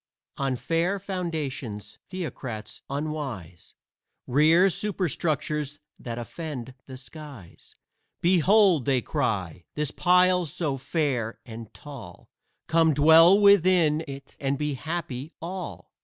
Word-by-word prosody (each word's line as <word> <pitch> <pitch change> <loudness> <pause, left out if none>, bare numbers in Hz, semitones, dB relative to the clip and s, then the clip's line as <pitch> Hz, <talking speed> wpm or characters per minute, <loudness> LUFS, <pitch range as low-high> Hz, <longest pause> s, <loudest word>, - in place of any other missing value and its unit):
On 135 -2 0
fair 170 +9 0
foundations 160 - -5
Theocrats 130 - -6
unwise 140 - -5 0.5
Rear 160 +8 +5
superstructures 155 -6 -2 0.2
that 120 -1 -6
offend 130 0 -6
the 130 -1 -8
skies. 135 - -12 0.4
"Behold," 180 - +4
they 130 -4 +1
cry, 95 -8 -2
"this 150 -1 -1
pile 180 -1 +3
so 145 -2 -2
fair 130 -6 -2
and 115 -2 -9
tall! 125 -13 -11 0.3
Come 160 -2 +3
dwell 165 +6 +7
within 180 -6 +5
it 135 0 -9
and 140 0 -1
be 150 0 -2
happy 155 -1 -5
all." 180 +2 -7
150 Hz, 105 wpm, -26 LUFS, 130-170 Hz, 0.5 s, dwell